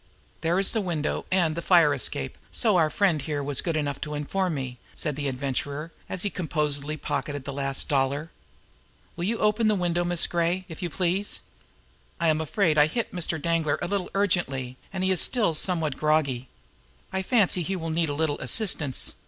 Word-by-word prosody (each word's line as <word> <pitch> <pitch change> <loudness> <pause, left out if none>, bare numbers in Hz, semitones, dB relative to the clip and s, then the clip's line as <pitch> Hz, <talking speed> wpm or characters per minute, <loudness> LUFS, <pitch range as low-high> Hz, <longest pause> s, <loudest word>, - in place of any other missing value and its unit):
"There 165 +2 +2
is 195 0 +3
the 225 - 0
window, 165 -6 -2
and 170 -4 +2
the 170 - -2
fire 165 -4 +5
escape, - - -2 0.2
so 220 -5 +2
our 160 -3 +4
friend 175 -4 +2
here 145 +1 -2
was 140 -1 0
good 165 -2 -1
enough 145 -2 -1
to 150 0 -3
inform 175 +4 -1
me," 130 -3 -5 0.2
said 150 -4 -2
the 145 0 -2
Adventurer, 140 +4 -2 0.2
as 185 - -1
he 205 - 0
composedly 150 -4 -1
pocketed 145 -2 -3
the 140 - -5
last 135 0 0
dollar. 140 +3 0 0.8
"Will 170 - -2
you 225 +4 0
open 215 +1 +2
the 215 - +4
window, 175 -2 +1
Miss 175 -1 +2
Gray, 175 +2 0
if 165 0 -9
you 175 - -2
please? 185 +5 -1 0.8
I 170 -1 +3
am 155 0 +2
afraid 160 -1 +2
I 150 - +7
hit 230 +9 -3
Mr. 170 -3 -2
Danglar 165 -2 +1
a 175 - -2
little 195 -1 -1
ungently, 140 -11 0 0.2
and 190 -1 -2
as - - +3
he - - +3
is 185 - +3
still 225 -9 +2
somewhat 160 -4 -1
groggy, 140 -5 +1 0.6
I 190 - 0
fancy 190 -4 +3
he 190 +4 -2
will 165 -3 -3
need 165 -1 +1
a 145 - -2
little 150 -1 0
assistance. 145 - +1
165 Hz, 195 wpm, -26 LUFS, 145-185 Hz, 0.8 s, I